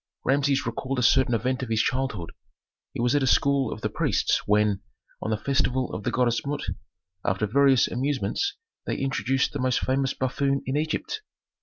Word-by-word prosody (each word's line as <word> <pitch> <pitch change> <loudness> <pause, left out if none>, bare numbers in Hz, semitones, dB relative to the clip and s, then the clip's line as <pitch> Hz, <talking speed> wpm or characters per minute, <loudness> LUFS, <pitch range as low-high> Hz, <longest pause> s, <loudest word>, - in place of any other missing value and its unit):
Rameses 140 0 +2
recalled 130 +3 -3
a 125 - +1
certain 125 +1 +4
event 125 +4 -1
of 130 - -4
his 110 -1 +1
childhood. 125 -9 -2 0.6
He - - -7
was 120 +2 +2
at 145 - +3
a 135 - +1
school 140 +1 +3
of 110 - -6
the - - -1
priests - - +1
when, 105 -1 +2 0.4
on - - -3
the 110 - +1
festival 130 0 0
of 90 - -4
the - - +2
goddess 120 -2 +1
Mut, 145 +1 -3 0.6
after 95 +3 0
various 135 +3 +4
amusements 145 - -1 0.3
they - - -1
introduced 135 -1 0
the 145 - -3
most 130 -1 +1
famous 135 0 0
buffoon 135 +1 0
in 130 - -2
Egypt. 155 - -2
130 Hz, 180 wpm, -26 LUFS, 120-140 Hz, 0.6 s, certain